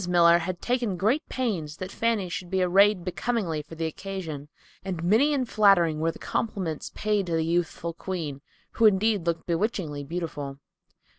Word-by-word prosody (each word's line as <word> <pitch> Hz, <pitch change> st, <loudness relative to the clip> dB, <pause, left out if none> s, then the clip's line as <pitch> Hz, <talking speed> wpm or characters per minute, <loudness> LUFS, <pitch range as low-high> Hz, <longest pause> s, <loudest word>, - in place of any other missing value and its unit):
Miller 170 Hz, -1 st, +6 dB
had 175 Hz, +1 st, -4 dB
taken 240 Hz, -6 st, 0 dB
great 220 Hz, -, +2 dB
pains 180 Hz, -, -2 dB
that 185 Hz, +1 st, -6 dB
Fanny 225 Hz, -5 st, 0 dB
should 175 Hz, 0 st, -5 dB
be 190 Hz, 0 st, +1 dB
arrayed 195 Hz, +1 st, +4 dB
becomingly 185 Hz, -4 st, -1 dB
for 155 Hz, +2 st, -12 dB
the 165 Hz, 0 st, -2 dB
occasion, 160 Hz, -4 st, -5 dB, 0.3 s
and 180 Hz, -4 st, -4 dB
many 225 Hz, +12 st, +4 dB
and 265 Hz, -4 st, 0 dB
flattering 190 Hz, -8 st, +4 dB
were 165 Hz, +1 st, +1 dB
the -, -, -12 dB
compliments 185 Hz, -8 st, -3 dB
paid 210 Hz, -3 st, 0 dB
to 170 Hz, -, -2 dB
the 160 Hz, -1 st, +1 dB
youthful 170 Hz, 0 st, -1 dB
queen, 160 Hz, -6 st, -5 dB, 0.3 s
who 230 Hz, -, +5 dB
indeed 205 Hz, -2 st, +2 dB
looked 165 Hz, -1 st, -1 dB
bewitchingly 170 Hz, -5 st, -1 dB
beautiful. 145 Hz, -3 st, -5 dB
180 Hz, 165 wpm, -26 LUFS, 165-205 Hz, 0.3 s, Miller